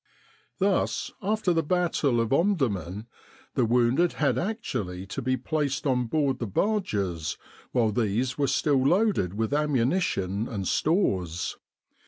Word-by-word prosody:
Thus, 195 Hz, 0 st, 0 dB
after 205 Hz, -2 st, +1 dB
the 165 Hz, -, +2 dB
battle 160 Hz, -6 st, +1 dB
of 115 Hz, +2 st, 0 dB
Omdurman, 115 Hz, -, 0 dB, 0.5 s
the 125 Hz, -, +2 dB
wounded 125 Hz, +8 st, +3 dB
had 145 Hz, -, +1 dB
actually 125 Hz, -, -3 dB
to 105 Hz, +8 st, -5 dB
be 130 Hz, +1 st, 0 dB
placed 140 Hz, +1 st, -2 dB
on 125 Hz, -3 st, +1 dB
board 140 Hz, -1 st, 0 dB
the 115 Hz, -, -2 dB
barges 100 Hz, -, -1 dB, 0.3 s
while 115 Hz, -4 st, +2 dB
these 120 Hz, +4 st, 0 dB
were 140 Hz, -1 st, +1 dB
still 140 Hz, -2 st, +2 dB
loaded 175 Hz, -, +2 dB
with 110 Hz, +5 st, -1 dB
ammunition 130 Hz, -, 0 dB
and 100 Hz, -6 st, -4 dB
stores. 95 Hz, -, 0 dB
130 Hz, 130 wpm, -27 LUFS, 105-165 Hz, 0.5 s, wounded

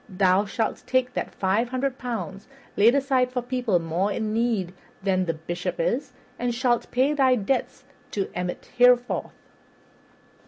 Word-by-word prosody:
Thou 190 Hz, +1 st, +3 dB
shalt 220 Hz, +2 st, -2 dB
take 255 Hz, -1 st, +1 dB
that -, -, -4 dB
five 205 Hz, +5 st, +1 dB
hundred 260 Hz, +1 st, -2 dB
pounds 220 Hz, -4 st, -5 dB, 0.3 s
laid 230 Hz, +5 st, +5 dB
aside 265 Hz, -2 st, +2 dB
for 250 Hz, -1 st, -2 dB
people 245 Hz, -6 st, 0 dB
more 170 Hz, +4 st, -1 dB
in 215 Hz, +1 st, -2 dB
need 220 Hz, -6 st, 0 dB, 0.3 s
than 185 Hz, -2 st, +1 dB
the 165 Hz, -, 0 dB
Bishop 175 Hz, -, -4 dB
is, -, -, 0 dB, 0.3 s
and 245 Hz, -1 st, -1 dB
shalt 240 Hz, -1 st, +1 dB
pay 265 Hz, +4 st, +2 dB
thy 265 Hz, -3 st, +4 dB
debts 240 Hz, +4 st, -2 dB, 0.3 s
to 200 Hz, -2 st, -2 dB
Emmet 180 Hz, 0 st, -5 dB
therewith." 245 Hz, 0 st, +4 dB
235 Hz, 150 wpm, -25 LUFS, 195-255 Hz, 0.3 s, laid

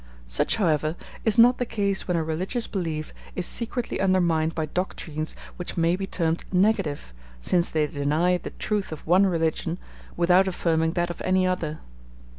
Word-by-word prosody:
Such, -, -, +1 dB
however, 155 Hz, -6 st, +1 dB, 0.3 s
is 220 Hz, 0 st, +2 dB
not 240 Hz, +2 st, +6 dB
the 245 Hz, -, +1 dB
case 200 Hz, -4 st, -1 dB
when 180 Hz, -2 st, +1 dB
a 165 Hz, -, +1 dB
religious 185 Hz, +10 st, -2 dB
belief 160 Hz, -5 st, -3 dB, 0.2 s
is 180 Hz, -, 0 dB
secretly 235 Hz, -2 st, -1 dB
undermined 170 Hz, -4 st, +2 dB
by 160 Hz, -, 0 dB
doctrines 155 Hz, -2 st, -3 dB, 0.2 s
which 180 Hz, -, -6 dB
may 165 Hz, +1 st, +3 dB
be 195 Hz, +1 st, -4 dB
termed 165 Hz, -3 st, 0 dB
negative, 180 Hz, -, +1 dB, 0.3 s
since 170 Hz, -, +1 dB
they 155 Hz, -1 st, +1 dB
deny 150 Hz, +5 st, +1 dB
the -, -, -6 dB
truth 210 Hz, -4 st, -2 dB
of 155 Hz, -, -7 dB
one 185 Hz, +4 st, +5 dB
religion 165 Hz, -1 st, 0 dB, 0.4 s
without 180 Hz, +2 st, +4 dB
affirming 165 Hz, -3 st, +1 dB
that 175 Hz, -1 st, 0 dB
of -, -, -9 dB
any 185 Hz, 0 st, +2 dB
other. 165 Hz, -4 st, -2 dB
175 Hz, 165 wpm, -25 LUFS, 160-190 Hz, 0.4 s, not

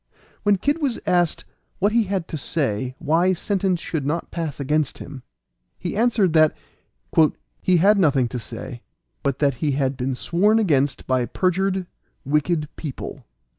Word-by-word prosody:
When 205 Hz, 0 st, +4 dB
Kid 290 Hz, -, 0 dB
was 270 Hz, -5 st, 0 dB
asked 175 Hz, -2 st, +1 dB, 0.3 s
what 205 Hz, +3 st, +2 dB
he 230 Hz, -1 st, +3 dB
had 190 Hz, -3 st, -2 dB
to -, -, -4 dB
say 130 Hz, -5 st, -2 dB
why 165 Hz, +4 st, +2 dB
sentence 190 Hz, 0 st, 0 dB
should 160 Hz, -3 st, -3 dB
not 155 Hz, +5 st, -2 dB
pass 160 Hz, -5 st, -4 dB
against 150 Hz, +1 st, 0 dB
him, 140 Hz, -2 st, -9 dB, 0.6 s
he 175 Hz, -, -4 dB
answered 215 Hz, -6 st, +2 dB
that 155 Hz, -1 st, +4 dB, 1.0 s
"he 185 Hz, -1 st, +3 dB
had 200 Hz, +4 st, +5 dB
nothing 140 Hz, -8 st, +3 dB
to 125 Hz, -, -4 dB
say, 120 Hz, +1 st, -8 dB, 0.4 s
but 140 Hz, -2 st, -1 dB
that 140 Hz, -1 st, +2 dB
he 145 Hz, -3 st, +1 dB
had 135 Hz, -1 st, 0 dB
been 130 Hz, +1 st, -2 dB
sworn 200 Hz, -, +2 dB
against 145 Hz, -, +1 dB
by 130 Hz, -2 st, +1 dB
perjured, 190 Hz, -, 0 dB, 0.4 s
wicked 150 Hz, +2 st, +1 dB
people." 145 Hz, -5 st, -7 dB
165 Hz, 155 wpm, -23 LUFS, 140-190 Hz, 1.0 s, had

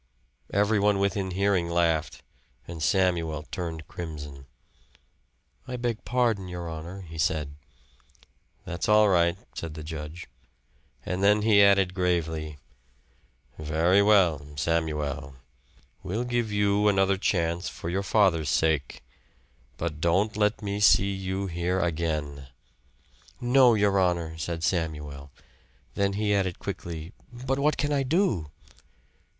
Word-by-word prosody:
Everyone 105 Hz, 0 st, +2 dB
within 100 Hz, -1 st, 0 dB
hearing 95 Hz, -2 st, +1 dB
laughed; 85 Hz, -2 st, 0 dB, 0.4 s
and 85 Hz, -2 st, -7 dB
Samuel 85 Hz, -3 st, +1 dB
turned 80 Hz, -3 st, -5 dB
crimson. 75 Hz, -5 st, -8 dB, 1.2 s
"I 125 Hz, -1 st, -4 dB
beg 120 Hz, -2 st, -3 dB
pardon, 115 Hz, -6 st, 0 dB
your 90 Hz, -1 st, -6 dB
honor," 85 Hz, +4 st, -7 dB
he 80 Hz, -3 st, -10 dB
said. 75 Hz, -2 st, 0 dB, 1.1 s
"That's 85 Hz, +4 st, -3 dB
all 105 Hz, 0 st, +6 dB
right," 85 Hz, -1 st, +3 dB, 0.2 s
said 80 Hz, -2 st, -6 dB
the 80 Hz, -, -7 dB
judge. 80 Hz, +2 st, -7 dB, 0.8 s
And 90 Hz, +1 st, -2 dB
then 105 Hz, +1 st, +4 dB
he 105 Hz, -2 st, +5 dB
added 100 Hz, -2 st, +4 dB
gravely, 80 Hz, -4 st, -1 dB, 1.0 s
"Very 80 Hz, +5 st, +2 dB
well, 95 Hz, -8 st, +4 dB
Samuel, 75 Hz, -3 st, -2 dB, 0.7 s
we'll 110 Hz, +7 st, -3 dB
give 120 Hz, -3 st, -1 dB
you 105 Hz, 0 st, +2 dB
another 95 Hz, -1 st, +3 dB
chance 85 Hz, -2 st, 0 dB
for -, -, -8 dB
your 95 Hz, +3 st, -1 dB
father's 90 Hz, -6 st, +2 dB
sake. 75 Hz, -3 st, 0 dB, 0.7 s
But 80 Hz, -2 st, -4 dB
don't 95 Hz, +6 st, +1 dB
let 105 Hz, +1 st, 0 dB
me 100 Hz, 0 st, -3 dB
see 100 Hz, -1 st, +5 dB
you 95 Hz, 0 st, -3 dB
here 90 Hz, +1 st, -1 dB
again." 75 Hz, -5 st, -2 dB, 0.9 s
"No, 125 Hz, -1 st, +5 dB
your 100 Hz, -2 st, +2 dB
honor," 85 Hz, -3 st, 0 dB
said 80 Hz, 0 st, -4 dB
Samuel. 75 Hz, -6 st, -3 dB, 0.6 s
Then 100 Hz, 0 st, 0 dB
he 105 Hz, 0 st, 0 dB
added 95 Hz, -3 st, 0 dB
quickly. 85 Hz, +2 st, -6 dB, 0.2 s
"But 130 Hz, +2 st, -3 dB
what 150 Hz, +1 st, +2 dB
can 145 Hz, 0 st, 0 dB
I 140 Hz, -, +1 dB
do?" 135 Hz, -, 0 dB
90 Hz, 120 wpm, -26 LUFS, 80-100 Hz, 1.2 s, all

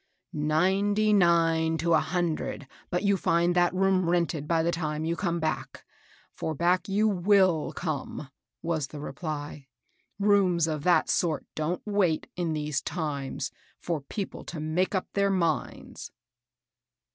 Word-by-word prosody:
" -, -, -43 dB, 0.2 s
Ninety 205 Hz, +4 st, +2 dB
nine 165 Hz, -3 st, +3 dB
to 165 Hz, +2 st, +1 dB
a 160 Hz, -, +6 dB
hundred 170 Hz, -5 st, -2 dB, 0.2 s
but 180 Hz, +2 st, -1 dB
you 200 Hz, -1 st, +3 dB
find 170 Hz, 0 st, +2 dB
that 175 Hz, 0 st, +4 dB
room 185 Hz, -1 st, +2 dB
rented 170 Hz, -4 st, 0 dB
by 165 Hz, 0 st, +2 dB
the 170 Hz, -, +1 dB
time 155 Hz, -2 st, -2 dB
you 165 Hz, +1 st, 0 dB
come 170 Hz, -1 st, -1 dB
back, 155 Hz, -1 st, -3 dB, 0.2 s
— -, -, -29 dB
for 160 Hz, -, -2 dB
back 175 Hz, +5 st, +1 dB
you 210 Hz, +3 st, +2 dB
wUl 185 Hz, -4 st, +3 dB
come," 150 Hz, -3 st, -4 dB, 0.3 s
was 160 Hz, -4 st, -1 dB
the 150 Hz, -, -9 dB
reply. 145 Hz, -1 st, -6 dB, 0.3 s
" -, -, -44 dB
Rooms 195 Hz, -5 st, +3 dB
of 155 Hz, -3 st, -3 dB
that 180 Hz, -, +4 dB
sort 160 Hz, -5 st, 0 dB
don't 155 Hz, +3 st, -2 dB
wait, 200 Hz, -6 st, +1 dB
in 170 Hz, -3 st, -1 dB
these 150 Hz, -2 st, -1 dB
times, 145 Hz, -5 st, -3 dB, 0.3 s
for 165 Hz, -4 st, -3 dB
people 195 Hz, +8 st, -6 dB
to 170 Hz, -, -6 dB
make 160 Hz, +6 st, 0 dB
up 185 Hz, -, 0 dB
their 200 Hz, 0 st, +2 dB
minds." 170 Hz, -5 st, -2 dB
170 Hz, 155 wpm, -27 LUFS, 155-185 Hz, 0.3 s, a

